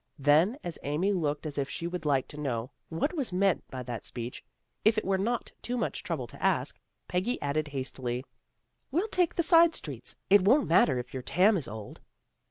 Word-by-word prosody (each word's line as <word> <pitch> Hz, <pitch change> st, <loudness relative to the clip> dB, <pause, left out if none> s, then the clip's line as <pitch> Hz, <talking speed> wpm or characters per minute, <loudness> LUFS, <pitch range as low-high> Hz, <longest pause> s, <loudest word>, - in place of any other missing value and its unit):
Then, 155 Hz, -, +4 dB
as 170 Hz, -3 st, -5 dB
Amy 165 Hz, +8 st, 0 dB
looked 150 Hz, -4 st, -1 dB
as 150 Hz, -2 st, -3 dB
if 140 Hz, -, -1 dB
she 170 Hz, -, -5 dB
would 175 Hz, -2 st, -4 dB
like 140 Hz, -3 st, +2 dB
to 150 Hz, -, -10 dB
know 125 Hz, -2 st, -2 dB, 0.2 s
what 165 Hz, -, -1 dB
was 280 Hz, -, -2 dB
meant 190 Hz, 0 st, +2 dB
by 130 Hz, -1 st, -5 dB
that 120 Hz, -2 st, -5 dB
speech, 120 Hz, 0 st, -6 dB, 0.4 s
if 220 Hz, +1 st, +4 dB
it 215 Hz, -, 0 dB
were 195 Hz, +1 st, +2 dB
not 235 Hz, +4 st, -1 dB
too 250 Hz, +1 st, -2 dB
much 235 Hz, -, -2 dB
trouble -, -, -3 dB
to -, -, -13 dB
ask, -, -, +1 dB, 0.3 s
Peggy 185 Hz, +8 st, -1 dB
added 145 Hz, +1 st, -1 dB
hastily, 130 Hz, -3 st, -3 dB, 0.3 s
" -, -, -49 dB
We'll 350 Hz, +10 st, +1 dB
take 360 Hz, -4 st, +1 dB
the 340 Hz, -, +2 dB
side 335 Hz, 0 st, +6 dB
streets. 135 Hz, -6 st, -6 dB
It 200 Hz, 0 st, +7 dB
won't 255 Hz, +10 st, +4 dB
matter 155 Hz, -5 st, +4 dB
if 125 Hz, 0 st, -5 dB
your 130 Hz, -, -3 dB
tarn 185 Hz, -, +4 dB
is 160 Hz, -9 st, -1 dB
old." 105 Hz, -1 st, -8 dB
165 Hz, 205 wpm, -29 LUFS, 135-215 Hz, 0.4 s, It